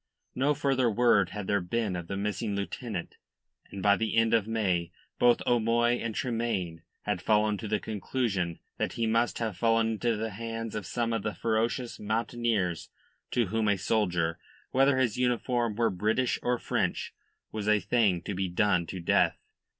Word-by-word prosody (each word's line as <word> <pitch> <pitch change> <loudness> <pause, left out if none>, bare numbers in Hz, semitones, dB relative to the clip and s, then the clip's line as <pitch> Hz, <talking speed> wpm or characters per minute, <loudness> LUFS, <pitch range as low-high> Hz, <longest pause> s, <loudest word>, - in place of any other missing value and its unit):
No 145 +3 +1
further 135 -3 +2
word 110 -4 +3
had 105 -1 -5
there 100 0 +1
been 100 +2 -1
of 85 -1 -5
the 100 - -3
missing 105 +1 -2
lieutenant, 100 -1 -4 0.5
and 100 -1 -7
by 100 0 +6
the 115 0 -1
end 115 0 +3
of 110 -2 +3
May 95 -7 0 0.3
both 120 -1 +4
O'Moy 120 0 +3
and 115 -2 -4
Tremayne 115 -9 -2 0.2
had 95 -4 -2
come 105 -1 +3
to 110 - -5
the 105 0 0
conclusion 100 -5 -2 0.2
that - - -1
he 115 -1 -1
must 115 +2 +1
have 110 -4 -2
fallen 115 0 +3
into 115 +1 0
the 110 +1 -3
hands 115 +1 -5
of 105 -3 -4
some 115 -1 -1
of 115 - 0
the 105 +1 -3
ferocious 115 +2 -1
mountaineers 110 -4 -1 0.4
to 120 -6 0
whom 110 +1 0
a 100 -1 +3
soldier 90 -5 0 0.3
whether 135 +1 +4
his 125 -4 +1
uniform 120 -2 0
were 115 +1 +2
British 110 +7 0
or 125 0 +1
French - - -2 0.4
was 105 -1 -4
a 105 0 +4
thing 100 -3 +2
to 100 - -4
be 95 0 -1
done 90 -2 +2
to 95 - -5
death. 85 - +2
110 Hz, 175 wpm, -29 LUFS, 100-115 Hz, 0.5 s, by